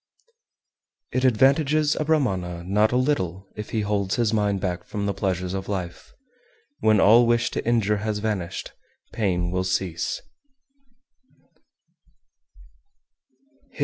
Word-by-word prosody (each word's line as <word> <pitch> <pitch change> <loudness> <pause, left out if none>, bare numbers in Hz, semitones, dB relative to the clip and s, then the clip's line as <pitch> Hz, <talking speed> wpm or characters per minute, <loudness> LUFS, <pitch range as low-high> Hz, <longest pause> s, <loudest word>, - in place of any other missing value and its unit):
390. - - -2
It 130 0 +4
advantages 145 +5 +3
a - - -1
Brahmana 95 - 0
not 105 +4 +2
a 125 - +2
little 95 - -1
if 105 - -7
he 110 - -1
holds 100 -2 -1
his 115 -3 +1
mind 105 -2 +1
back 90 -2 -3
from 100 -1 -4
the 100 - 0
pleasures 95 -2 -2
of 95 0 -4
life; 90 -4 -5 0.7
when 110 -1 +3
all 115 +4 +6
wish 120 0 +2
to - - -3
injure 110 -3 +2
has 105 0 -2
vanished, 105 -5 -3 0.4
pain 90 -5 -1
will 90 0 0
cease. 90 -2 -2
105 Hz, 125 wpm, -24 LUFS, 95-120 Hz, 0.7 s, all